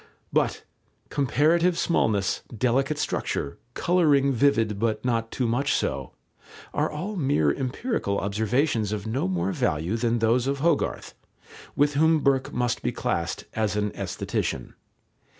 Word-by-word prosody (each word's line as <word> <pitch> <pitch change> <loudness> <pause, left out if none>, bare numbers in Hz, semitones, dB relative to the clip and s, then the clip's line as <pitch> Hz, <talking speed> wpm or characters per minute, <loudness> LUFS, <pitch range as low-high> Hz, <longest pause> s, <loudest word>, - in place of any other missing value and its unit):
But - - +1 0.5
"comparative 165 +6 +2
smallness, 105 - +1 0.2
delicate 135 +5 +1
structure, 70 - -2 0.2
colouring 150 -6 +3
vivid 115 -6 +2
but 115 +1 -1
not 115 -2 0
too 125 0 -1
much 125 +5 +1
so," - - -2 0.6
are - - +1
all 180 +8 -4
mere 135 - +2
empirical 130 - -2
observations 110 +3 0
of 105 -2 -3
no 110 -1 -1
more 95 0 -1
value 85 +3 0
than 115 0 +1
those 115 +3 +2
of 140 0 0
Hogarth, 160 +1 0 0.6
with 145 +1 +3
whom 160 +2 +3
Burke 135 -2 +1
must 125 -1 -1
be - - -1
classed - - -2
as 110 -1 0
an 105 -1 0
aesthetician. - - -3
125 Hz, 135 wpm, -25 LUFS, 110-145 Hz, 0.6 s, colouring